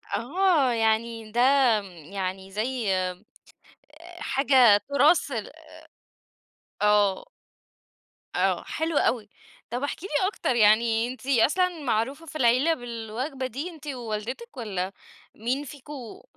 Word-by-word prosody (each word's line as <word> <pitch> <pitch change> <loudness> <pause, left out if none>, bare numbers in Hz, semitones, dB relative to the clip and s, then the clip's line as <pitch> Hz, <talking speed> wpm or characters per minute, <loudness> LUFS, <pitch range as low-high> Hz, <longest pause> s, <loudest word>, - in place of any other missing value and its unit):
آه. 300 - +2
يعني 225 0 0
ده 240 +2 +1 0.4
م - - -12 0.3
يعني 190 0 -4
زي 220 -1 -1
آآ 185 +1 -3 1.0
حاجة 260 -5 +5
تُراث 290 +2 +4
ال 220 -4 -4 1.3
آه. 205 -2 +3 1.1
آه، - - +1
حلو 320 -2 -2
أوي. 215 -4 +1 0.4
طب 245 +4 -3
احكي 320 +5 -4
لي 375 +1 +1
أكتر، 260 - -1
يعني 225 +1 +4
أنتِ 255 +1 -9
أصلًا 325 +7 +2
معروفة 265 +7 -1
في 310 - -11
العيلة 255 +6 +3
بالوجبة 245 +2 -5
دي 280 +9 -5
أنتِ 310 -3 -13
ووالدتِك 245 - -5
والّا 195 -5 -3 0.4
مين 250 +6 -2
فيكم 275 - -10
245 Hz, 115 wpm, -26 LUFS, 215-285 Hz, 1.3 s, حاجة